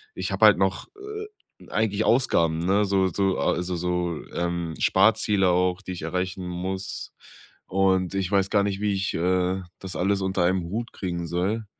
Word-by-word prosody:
ich - - -3
habe - - +4
halt - - +6
noch, - - 0
äh, 425 +1 -7 0.4
eigentlich 105 -1 0
Ausgaben 85 -10 +3
ne, 95 +4 +2
so 95 -1 +2
so 95 +1 0
a 90 - +1
so 90 0 -3
so 90 -1 -1
ähm, 85 -1 -2
Sparziele 100 -1 +3
auch, 90 +2 +1
die 95 - -6
ich 90 - -7
erreichen 90 +2 -3
muss. 95 +2 -5 0.5
Und 95 -1 +1
ich 95 -2 -1
weiß 100 -1 +2
gar 100 -1 +3
nicht, 100 0 -2
wie 105 -1 +1
ich, 95 0 -1
äh, 90 +2 +1 0.2
das 95 -1 -6
alles 100 +2 +1
unter 95 -1 0
einem 90 0 +1
Hut 115 +4 -4
kriegen 85 -3 -4
soll. 100 +6 -1
95 Hz, 180 wpm, -25 LUFS, 90-100 Hz, 0.5 s, halt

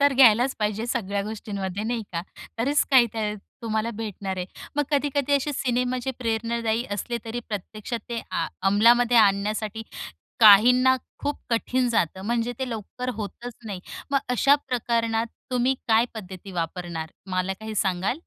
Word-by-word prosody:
तर 285 0 +5
घ्यायलाच 250 0 +6
पाहिजे 215 +1 -1
सगळ्या 205 -5 -1
गोष्टींमध्ये, 200 -2 -4
नाही 235 -1 -1
का. 170 - -2 0.4
तरीच 280 +6 +2
काय 255 -3 +7
ते 210 -1 -1 0.3
तुम्हाला 220 0 -1
भेटणार 205 -3 -5
आहे. 180 0 -3 0.3
मग 295 - +3
कधी-कधी 285 -1 +1
असे 290 +2 -2
सिनेमा 250 -1 0
जे 265 - -1
प्रेरणादायी 230 0 -1
असले, 220 +4 -2
तरी 235 +2 -4
प्रत्यक्षात 215 +3 -4
ते 235 -1 -2
आ - - 0 0.2
अमलामध्ये 235 +4 +5
आणण्यासाठी 215 +1 +2 0.6
काहींना 245 +5 +8 0.2
खूप 290 0 -2
कठीण 245 +2 +1
जातं. 190 -4 0
म्हणजे 235 +3 0
ते 265 -1 -2
लवकर 230 +3 -5
होतच 225 +3 -6
नाही. 195 -3 -5 0.3
मग, 275 - +4
अशा 250 +3 +5
प्रकरणात 230 -2 0 0.2
तुम्ही 250 +1 +2
काय 225 +1 +5
पद्धती 190 -2 -8
वापरणार, 170 -1 -4 0.2
मला 185 +1 0
काही 220 0 -6
सांगाल? 190 +4 0
225 Hz, 150 wpm, -25 LUFS, 205-245 Hz, 0.6 s, काहींना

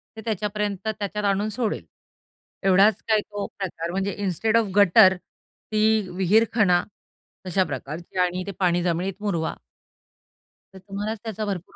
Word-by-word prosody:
ते 220 - -8
त्याच्यापर्यंत 210 -2 -2
त्याच्यात 210 -1 -3
आणून 200 +2 +1
सोडेल, 225 0 -2 0.8
एवढाच 195 +3 +4
काय 220 -1 +4
तो 205 -1 -6
प्रकार 170 -3 -4
म्हणजे 195 +2 -1
इन्स्टेड 205 +3 0
ऑफ 230 - +3
गटर, 195 -1 +7
ती 215 +2 -2
विहीरखणा, 190 0 +3 0.6
अशा 185 +1 +2
प्रकारची 155 +4 -7
आणि 180 0 +1
ते 200 - -3
पाणी 175 -1 +2
जमिनीत 180 +2 -1
मुरवा. 175 -6 -1 1.2
तर 190 - -11
तुम्हालाच 205 +3 -4
त्याचा 220 -1 -4
भरपूर 190 -3 -5
200 Hz, 135 wpm, -24 LUFS, 180-215 Hz, 1.2 s, गटर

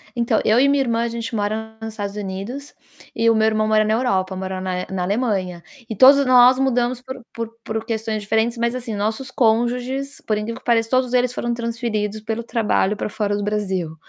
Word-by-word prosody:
Então, 235 -1 +1
eu 220 +3 +4
e 275 - +5
minha 280 0 +3
irmã, 230 -2 0
a - - 0
gente 230 0 -5
mora 220 +2 -3
nos 220 0 -6
Estados 205 -2 -5
Unidos 210 +8 -6 0.4
e 230 0 +3
o 230 - +4
meu 220 0 +3
irmão 215 0 +1
mora 215 0 +4
na 215 - +1
Europa, 190 -6 0
mora 190 0 -4
na 185 -1 -3
na 185 -2 -2
Alemanha. 195 -4 -1 0.3
E 220 - -4
todos 275 +5 +7
nós 255 0 +6
mudamos 250 -2 +1
por 260 0 -9
por 230 -1 -4
por 220 0 -4
questões 220 -1 -2
diferentes, 220 +3 0
mas, 235 +1 0
assim, 240 -3 -5
nossos 220 +6 -2
cônjuges, 250 +4 0
por 215 - 0
incrível 220 +2 -4
que - - -38
pareça, 230 -2 +2
todos 255 0 +1
eles 250 0 +2
foram 240 -1 -2
transferidos, 230 -3 -3
pelo 220 +2 -3
trabalho, 215 -3 0
pra - - -3
fora 205 -1 -1
do 205 - -3
Brasil. 190 -6 -2
225 Hz, 210 wpm, -21 LUFS, 210-245 Hz, 0.4 s, todos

